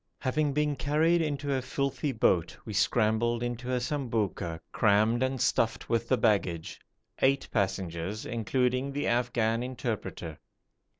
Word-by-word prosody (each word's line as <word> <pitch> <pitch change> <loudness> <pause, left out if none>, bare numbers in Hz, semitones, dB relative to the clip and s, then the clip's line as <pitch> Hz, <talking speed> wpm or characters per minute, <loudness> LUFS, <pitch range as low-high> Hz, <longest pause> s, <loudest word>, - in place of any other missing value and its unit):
Having 145 +2 0
been 150 0 +1
carried 160 +5 +2
into 145 -2 -1
a 130 - 0
filthy 140 +2 -2
boat, 90 -8 +1
we 110 - -6
scrambled 115 +3 +2
into 120 +1 -3
a 125 - +1
sambouka 115 - -2
crammed 110 +3 +3
and 130 0 0
stuffed 115 0 +1
with 115 0 0
the 130 - +4
baggage 95 -8 0 0.4
eight 135 +1 +3
passengers, 95 -1 -2
including 125 +3 0
the 145 +1 -2
Afghan 120 -1 +1
interpreter. 120 - -4
120 Hz, 130 wpm, -29 LUFS, 110-135 Hz, 0.4 s, the